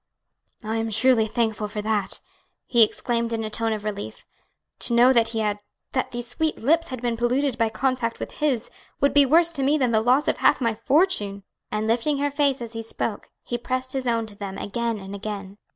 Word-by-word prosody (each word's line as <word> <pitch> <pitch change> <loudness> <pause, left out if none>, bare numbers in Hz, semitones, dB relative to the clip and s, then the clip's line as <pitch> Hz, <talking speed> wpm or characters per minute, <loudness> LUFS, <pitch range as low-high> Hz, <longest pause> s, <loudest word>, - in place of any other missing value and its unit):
"I 220 +1 -2
am 225 0 -1
truly 225 +1 +3
thankful 220 -2 -1
for 210 0 -5
that!" 210 -2 -1 0.4
he 235 - +3
exclaimed 235 +1 +1
in 225 -1 -2
a 215 - -4
tone 225 +1 +1
of 215 -2 -3
relief; 205 -1 -6 0.5
"to 235 - +3
know 245 +2 +6
that 230 -2 +4
he 225 -1 -1
had 210 -1 -1 0.3
that 260 - -1
these 240 0 -5
sweet 310 +6 -1
lips 325 +7 +2
had 255 -2 -7
been 240 -1 0
polluted 250 +3 0
by 230 -2 +1
contact 245 0 -1
with - - -5
his 275 -7 0 0.3
would 280 - +2
be 285 -1 +6
worse 335 +4 +4
to 300 -5 -4
me 285 +3 +3
than 255 -5 +1
the 220 -1 +3
loss 255 +6 +3
of - - +1
half - - +3
my 230 -4 +1
fortune." 220 - +1 0.3
And 215 +1 -1
lifting 240 +6 +1
her 285 +1 0
face 280 -3 +1
as 230 0 -8
he 225 - -4
spoke, 225 -1 -4
he 240 - -3
pressed 255 +1 -3
his 265 -2 -2
own 230 -1 +1
to 210 -2 -13
them 195 -1 -6
again 230 +2 -2
and 195 -1 -8
again. 200 -1 -6
235 Hz, 215 wpm, -24 LUFS, 220-260 Hz, 0.5 s, know